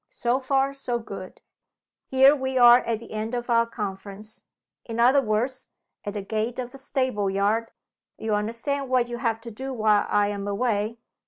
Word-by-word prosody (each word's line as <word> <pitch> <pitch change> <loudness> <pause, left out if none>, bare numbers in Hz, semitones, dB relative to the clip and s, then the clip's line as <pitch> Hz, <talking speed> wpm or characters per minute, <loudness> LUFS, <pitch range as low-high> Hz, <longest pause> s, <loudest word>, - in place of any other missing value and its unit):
So 245 +2 0
far 270 +1 +1
so 255 -3 -2
good. 230 - -9 0.7
Here 265 +2 +6
we 265 -2 -2
are 240 0 +8
at 230 -3 -2
the 230 - -13
end 220 +3 -3
of 240 0 -3
our 230 0 +4
conference 205 -1 -6 0.4
in 230 0 -6
other 260 +4 +5
words, 240 +3 -1 0.4
at 205 - -4
the 205 - -3
gate 220 +3 -2
of 250 -1 -4
the 275 - -12
stable 255 -7 -1
yard. 205 +4 +1 0.5
You 220 -1 -2
understand 235 +6 -2
what 250 -2 +2
you 240 - -4
have 230 -2 -1
to 235 0 -8
do 265 +5 -6
while 215 -3 +2
I 205 0 +2
am 200 -1 -4
away?" 215 +1 -1
230 Hz, 180 wpm, -25 LUFS, 215-255 Hz, 0.7 s, are